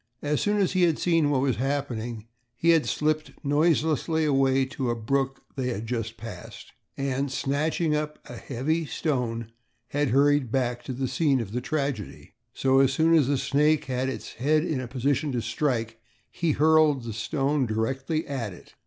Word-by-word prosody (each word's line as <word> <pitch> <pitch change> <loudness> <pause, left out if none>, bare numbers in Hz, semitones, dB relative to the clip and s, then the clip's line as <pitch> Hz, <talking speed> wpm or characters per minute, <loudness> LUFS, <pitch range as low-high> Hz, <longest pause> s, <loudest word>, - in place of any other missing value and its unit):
As 145 0 0
soon 210 0 +1
as 195 -3 +2
he 185 - +1
had 170 -3 +3
seen 165 -4 +2
what 135 -3 +2
was 135 -4 +1
happening 120 -4 -3 0.3
he 165 +8 +1
had 165 -2 +3
slipped 155 0 -1
noiselessly 160 +1 +2
away 135 -2 +3
to 130 -1 -3
a 120 - 0
brook 135 +4 -1
they 130 -2 -2
had 115 -3 -3
just 115 -1 -3
passed 110 -5 -9 0.3
and, 135 0 -1
snatching 150 +4 0
up 150 0 -3
a 120 - -8
heavy 145 +7 -2
stone, 115 -8 -2 0.4
had 145 -1 0
hurried 140 -1 +3
back 120 -2 -1
to 130 - -4
the 130 +1 -2
scene 140 -1 +2
of 110 -4 -5
the 125 +3 -2
tragedy. 140 - -3 0.2
So, 135 0 +2
as 135 -1 +4
soon 160 +4 +3
as 155 -6 +5
the 140 0 +2
snake 150 +3 +2
had 130 0 -1
its 130 - -6
head 155 +6 +1
in 150 -6 -1
a 125 - -5
position 140 +3 0
to 120 - 0
strike 115 -2 -2 0.3
he 165 -3 0
hurled 155 -3 +4
the 115 -1 -5
stone 135 +4 0
directly 135 +8 -1
at 125 -8 -4
it. - - -16
135 Hz, 180 wpm, -26 LUFS, 125-150 Hz, 0.4 s, as